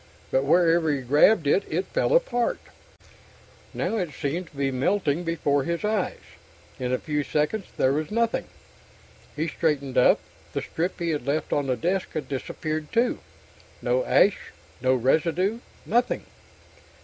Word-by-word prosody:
But 135 +1 +2
wherever 165 0 +4
he 140 -2 -1
grabbed 150 - +4
it, 145 +7 +3
it 175 +5 -1
fell - - +1
apart. 245 - +1 1.1
Now 225 - -2
it 175 -8 -3
seemed 165 +5 -3
to - - -19
be 135 -1 0
melting 155 +4 0
before 145 -4 0
his 170 +6 -2
eyes. 210 -3 0 0.6
In 125 -1 -2
a 130 - +2
few 150 +1 -2
seconds 150 +8 -1
there 130 - +3
was 155 +1 -2
nothing. 230 +1 0 0.9
He 155 +2 -1
straightened 145 -6 0
up. 125 - +5 0.3
The - - -1
strip 175 +3 -3
he 170 -1 -1
had 150 -2 -3
left 150 +3 -1
on 145 -1 0
the 130 - +1
desk 185 +2 -1
had 155 - -3
disappeared, 155 +3 -4
too. 235 +2 +1 0.6
No - - +1
ash, - - +4 0.4
no 130 0 +3
residue. 165 - +1 0.3
Nothing. 240 +3 +1
160 Hz, 150 wpm, -25 LUFS, 140-190 Hz, 1.1 s, up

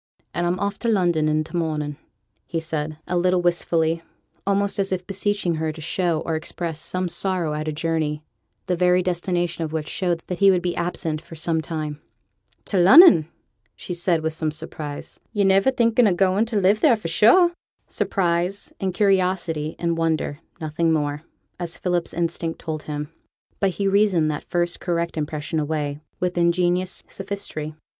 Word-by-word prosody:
'And 175 0 0
I'm 175 +1 0
off 200 0 -2
to 235 - -2
London 175 -8 +2
i' 155 0 +1
t' 160 - -10
morning,' 155 -3 -1 0.6
added 160 -2 -2
he, 170 +3 -7
a - - +2
little 180 +1 +3
wistfully, 165 -1 +1 0.5
almost 200 0 +1
as 195 -1 0
if 180 -1 -2
beseeching 195 -3 -1
her 160 0 -1
to 155 - -11
show 165 0 0
or 165 - -3
express 160 0 -4
some 185 +3 -1
sorrow 175 -2 -1
at 155 +1 -3
a - - 0
journey, 155 -1 -1 0.4
the 180 - 0
very 180 +1 +3
destination 175 -1 -1
of 155 - -4
which 155 -1 -3
showed 175 -3 -1
that 180 - -5
he 200 -1 +6
would 180 -2 +3
be 175 -1 -1
absent 170 -2 -2
for 165 - -12
some 160 0 -1
time. 155 -2 -5 0.6
'To 200 - -1
Lunnon!' 190 - +8 0.5
said 175 0 -1
she, - - 0
with 160 0 -1
some 160 0 -1
surprise. 150 -1 -7
'Yo're 205 -3 +2
niver 195 +5 +4
thinking 235 -2 +3
o' 195 - +3
going 195 +4 +3
to 230 -1 -5
live 200 +3 +3
theere, 255 -7 +5
for 210 - -5
sure!' 235 - +5 0.4
Surprise, 180 +1 -1
and 190 -2 -2
curiosity, 180 -6 +1
and 170 -1 -1
wonder; 160 -3 0 0.2
nothing 160 +1 0
more, 145 -2 0 0.4
as 170 -1 -5
Philip's 175 -2 -1
instinct 165 -1 -2
told 155 -1 -5
him. 150 0 -4 0.5
But 195 - +3
he 200 - +1
reasoned 195 -6 +3
that 150 - -6
first 175 0 0
correct 170 -1 -1
impression 155 0 -2
away 150 -1 -2 0.2
with 180 -1 -1
ingenious 175 +1 +1
sophistry. 195 -6 -5
170 Hz, 175 wpm, -23 LUFS, 160-185 Hz, 0.6 s, Lunnon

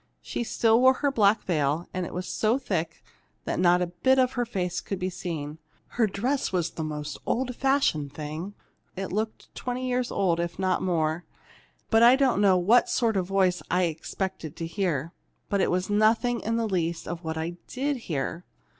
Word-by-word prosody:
She - - -3
still 225 0 +3
wore 260 0 +6
her 285 - +3
black 215 -4 +3
veil, 155 -1 0
and 180 -1 -2
it - - -9
was 185 +1 -4
so 220 +3 +1
thick 170 -11 -3 0.4
that - - -2
not 180 0 +4
a 175 0 -5
bit 260 0 +5
of 255 -1 +3
her 245 -2 -2
face 180 -5 -2
could 195 - -4
be 185 0 -2
seen. 160 -4 -5 0.3
Her 230 -3 +1
dress 245 +8 -1
was 175 -3 0
the 160 - -5
most 150 -1 -5
old 250 0 -1
fashioned 265 - +1
thing 155 +7 -6 0.4
it 195 0 -4
looked 215 +2 -3
twenty 255 +1 -3
years 250 -1 0
old, 175 -4 +1
if 170 0 -3
not 185 -1 +1
more. 165 -2 0 0.7
I 235 +3 +7
don't 265 -7 +2
know 195 -3 +5
what 215 +8 +4
sort 230 -3 +1
of 185 -2 +1
a - - -14
voice 190 -2 +2
I 180 +1 +2
had 170 - +2
expected 165 0 -5
to 165 - -4
hear, 165 -2 -2 0.4
but 200 -1 +1
it - - +2
was 180 +1 0
nothing 225 +3 +2
in 225 +1 -2
the 230 -1 0
least 170 -4 -1
like 175 0 -5
what 160 0 -3
I 165 +2 -3
did 280 +2 -1
hear. 165 - -3
185 Hz, 200 wpm, -27 LUFS, 170-230 Hz, 0.7 s, I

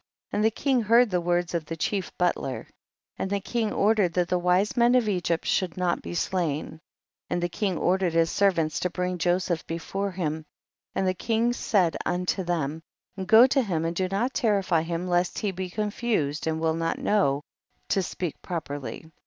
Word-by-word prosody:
39. - - -1
And 210 - +2
the - - +6
king 265 -4 +2
heard 230 +1 +4
the 180 -1 +1
words 175 0 0
of 165 -2 -1
the 165 - -5
chief 190 +4 -2
butler, 175 -7 -1 0.5
and 190 - -2
the 200 0 0
king 225 +2 -1
or 210 +2 +3
dered 195 -6 +1
that 180 -1 +1
the 180 - +1
wise 180 +5 +2
men 240 0 +4
of 245 -3 +3
Egypt 175 -4 0
shoidd 185 -2 0
not 180 -1 0
be - - -6
slain. 170 -5 -1
40. 160 - -13 0.5
And 175 0 -1
the 175 - 0
king 190 -1 -1
ordered 185 -1 +1
his 165 -1 +3
ser 200 -1 +4
vants 160 -4 -1
to 180 - 0
bring 180 0 -2
Joseph 175 0 0
before 195 +4 -3
him, 160 -4 -3 0.5
and 190 - +1
the 185 - +2
king 230 +5 0
said 190 -8 +1
unto 180 +2 -1
them, 160 -3 -2 0.5
go 220 +3 +8
to 265 +1 +3
him 170 -8 -1
and 165 +1 -2
do 185 +1 0
not 205 +8 -1
terrify 200 - +2
him 170 +2 -3
lest 175 0 +1
he 205 - -1
be 185 0 -5
con 210 +3 -2
fused 160 -12 -1
and 160 0 0
will 160 0 +1
not 165 0 -1
know 150 -9 +1 0.5
to 195 - +2
speak 175 -2 -4
pro 175 -3 -2
perly. 145 +2 -7
180 Hz, 205 wpm, -26 LUFS, 165-200 Hz, 0.5 s, go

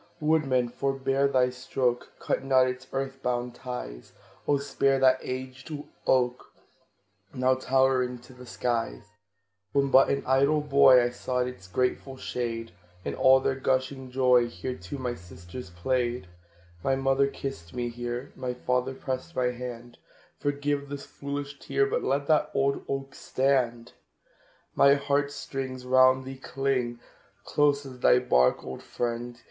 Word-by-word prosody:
Woodman, 140 -6 +2
forebear 135 +1 0
thy 130 -2 +2
stroke! 125 -1 -2
Cut - - -2
not 130 -1 +4
its 130 +1 -5
earth 135 0 -3
bound 125 -1 -1
ties; 120 - -7 0.3
Oh, 145 - +4
spare 140 -1 +1
that 130 -1 +4
aged 130 +2 -6 0.4
oak, 125 -1 +2 0.9
Now 130 0 +3
towering 130 -1 +2
to 125 +2 -15
the 125 0 -13
skies! 120 -1 -2 0.7
When 140 -1 +2
but 135 0 +6
an 140 0 0
idle 140 +3 +3
boy, 140 -3 +6
I 120 - 0
sought 125 +1 -1
its 110 -7 -9
grateful 130 +5 -1
shade; 115 -3 -4 0.3
In - - -2
all 130 0 +5
their 135 - +1
gushing 130 0 -1
joy 125 -2 +4
Here, 125 +2 -5
too, 90 +3 -7
my 125 -2 -2
sisters 90 +3 -10
played. 120 +5 -1 0.6
My 135 - +2
mother 135 +1 +2
kissed 135 -11 -6
me 120 -1 -2
here; 120 +2 -5
My 125 -1 -4
father 125 +1 -1
pressed 130 +5 -5
my 125 -1 +1
hand 120 -1 -8 0.4
Forgive 145 0 -1
this 140 0 -6
foolish 140 0 -6
tear, 415 - +1
But 470 +4 -1
let 140 +1 0
that 155 0 +3
old 140 0 +1
oak 135 0 -3
stand. 125 -4 0 0.8
My 140 0 +6
heart 140 0 0
strings 130 -3 -5
round 130 0 +5
thee 135 0 -7
cling, 125 -3 -1 0.5
Close 145 -1 +2
as 130 -2 -10
thy 125 - +5
bark, 65 - +3
old 65 - -7
friend! 120 0 -4
130 Hz, 145 wpm, -27 LUFS, 125-135 Hz, 0.9 s, but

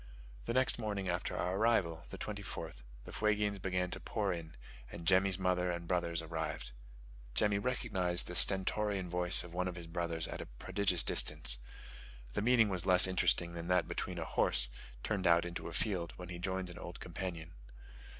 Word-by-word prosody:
The - - -2
next 130 -2 +4
morning 105 -4 -3
after 90 0 -2
our 90 +2 -1
arrival 95 -7 +1
(the - - -8
24th) 100 - -6 0.2
the - - -10
Fuegians 105 -2 0
began 90 -1 -1
to - - -3
pour 100 -4 -1
in, 80 -2 -8 0.4
and 85 - -8
Jemmy's 95 +1 +4
mother 90 -1 +1
and 85 -1 -4
brothers 85 -2 0
arrived. 80 -4 -4 0.6
Jemmy 105 +3 +3
recognised 100 -7 0
the 90 - -7
stentorian 95 0 +2
voice 90 0 +4
of 85 -1 -11
one 90 +1 -1
of 90 - -4
his 85 -1 -7
brothers 85 -1 -3
at - - -6
a - - -8
prodigious 90 +8 +1
distance. - - 0 0.7
The - - -1
meeting 115 0 +4
was 95 -1 -1
less 90 -1 +8
interesting 90 -2 +1
than 85 0 -6
that 90 0 +2
between - - -4
a - - -3
horse, - - +3 0.3
turned 100 -4 0
out 85 0 +5
into 85 -1 -5
a - - -6
field, 90 -5 0
when 90 -1 -8
he 85 -1 -6
joins 95 0 -2
an 85 - -10
old 85 0 -8
companion. 85 -2 -6
90 Hz, 180 wpm, -34 LUFS, 85-100 Hz, 0.7 s, less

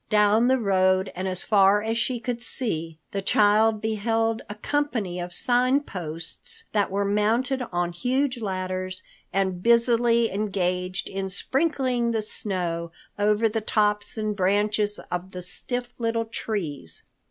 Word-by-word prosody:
Down 215 +2 +4
the 260 +1 +4
road 190 -3 +2
and 185 +1 -3
as 185 -1 -3
far 205 -1 +4
as 225 +1 -1
she 240 +1 0
could 240 +1 -3
see, 165 -11 -2
the 200 - -2
child 210 +2 +4
beheld 225 +1 0
a 210 - -5
company 220 -7 -1
of 175 0 -5
Sign 250 +6 +2
Posts 180 - -7
that 205 -2 +1
were 200 +1 0
mounted 225 +6 +1
on 175 -1 0
huge 255 +6 0
ladders 185 -2 -3 0.3
and 190 -2 0
busily 235 0 +4
engaged 185 -2 -1
in 195 0 -3
sprinkling 260 - 0
the 225 -2 0
snow 175 -5 -3 0.3
over 210 +2 +3
the 220 0 -2
tops 210 0 +1
and 215 -1 -1
branches 205 +2 +1
of 180 +2 -4
the 180 0 -6
stiff 245 +7 -4
little 230 0 0
trees. 160 - -5
210 Hz, 140 wpm, -25 LUFS, 185-235 Hz, 0.3 s, Down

